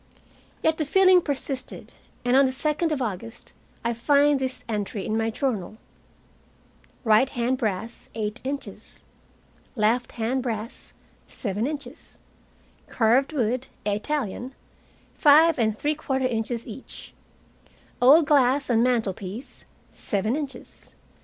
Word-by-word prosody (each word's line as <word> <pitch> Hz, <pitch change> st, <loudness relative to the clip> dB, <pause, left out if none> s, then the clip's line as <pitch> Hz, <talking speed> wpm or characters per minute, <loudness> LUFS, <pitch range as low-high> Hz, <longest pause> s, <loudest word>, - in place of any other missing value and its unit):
Yet 320 Hz, 0 st, +2 dB
the 310 Hz, -, 0 dB
feeling 370 Hz, +3 st, +5 dB
persisted, 275 Hz, -3 st, -5 dB, 0.3 s
and 245 Hz, +1 st, +3 dB
on 275 Hz, +1 st, +6 dB
the -, -, -1 dB
second 305 Hz, +4 st, -1 dB
of 280 Hz, -4 st, -1 dB
August 225 Hz, +1 st, -6 dB, 0.3 s
I 235 Hz, -, +1 dB
find 285 Hz, +4 st, +3 dB
this 260 Hz, -1 st, -3 dB
entry 210 Hz, -2 st, -3 dB
in 215 Hz, -, -1 dB
my 225 Hz, 0 st, 0 dB
journal: 220 Hz, -5 st, -3 dB, 1.3 s
Right 225 Hz, +3 st, +4 dB
hand 250 Hz, 0 st, -1 dB
brass, 220 Hz, 0 st, -3 dB
eight 215 Hz, +1 st, -3 dB
inches; 275 Hz, +2 st, -6 dB, 0.7 s
left 230 Hz, +2 st, +1 dB
hand 240 Hz, +3 st, -1 dB
brass, 230 Hz, -1 st, -5 dB, 0.3 s
seven 210 Hz, +2 st, -3 dB
inches; 290 Hz, -3 st, -8 dB, 0.7 s
carved 245 Hz, +5 st, +2 dB
wood 250 Hz, -2 st, -1 dB, 0.2 s
Italian 245 Hz, +3 st, -2 dB, 0.6 s
five 310 Hz, +1 st, +5 dB
and 220 Hz, -2 st, +1 dB
three 295 Hz, +5 st, 0 dB
quarter 265 Hz, -4 st, -2 dB
inches 235 Hz, -1 st, -2 dB
each; 235 Hz, +3 st, -10 dB, 0.9 s
old 290 Hz, +6 st, +7 dB
glass 275 Hz, -2 st, +3 dB
on 230 Hz, -1 st, +4 dB
mantelpiece 225 Hz, -2 st, -2 dB, 0.3 s
seven 215 Hz, +4 st, -1 dB
inches. 290 Hz, -3 st, -8 dB
250 Hz, 120 wpm, -25 LUFS, 225-280 Hz, 1.3 s, old